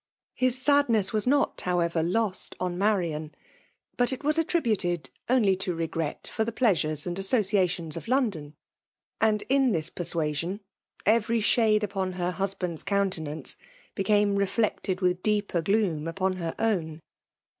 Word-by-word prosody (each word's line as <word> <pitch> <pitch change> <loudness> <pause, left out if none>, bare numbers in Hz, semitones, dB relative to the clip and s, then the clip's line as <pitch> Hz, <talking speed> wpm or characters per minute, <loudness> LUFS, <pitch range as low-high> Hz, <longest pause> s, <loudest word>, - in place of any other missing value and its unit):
His 255 0 +3
sadxiess 255 -7 +3
was 215 +2 +1
not, 280 +2 +2
however^ 170 -2 0
lost 200 +3 -1
on 180 -1 -2
Marian; 175 -6 -1 0.6
but 245 +2 +2
it 260 - -5
was 305 +2 +2
attributed 200 - 0 0.2
only 225 -7 +4
to 185 -2 -2
regret 165 -2 -3
for 220 - +1
tbe 230 0 -4
plea 240 -3 +4
sures 155 -3 -2
and 175 +1 -3
associations 190 - +1
of - - -7
London; 205 - -1 0.6
and 215 -1 +2
m 270 0 +3
Ibis 165 -8 -1
persuasion, 170 +2 -2 0.4
every 230 +2 +3
shade 215 0 +3
upon 190 -2 -2
ber 180 0 -2
buabandTs 180 -3 -3
^untenaoce 180 -7 -1 0.4
became 205 0 +2
reflected 200 -1 -1
with. 180 0 +1
deeper 205 -4 0
gloom 175 -5 0
upon 185 +2 -1
her 165 -2 -4
own. 170 -8 -1
195 Hz, 140 wpm, -27 LUFS, 170-220 Hz, 0.6 s, only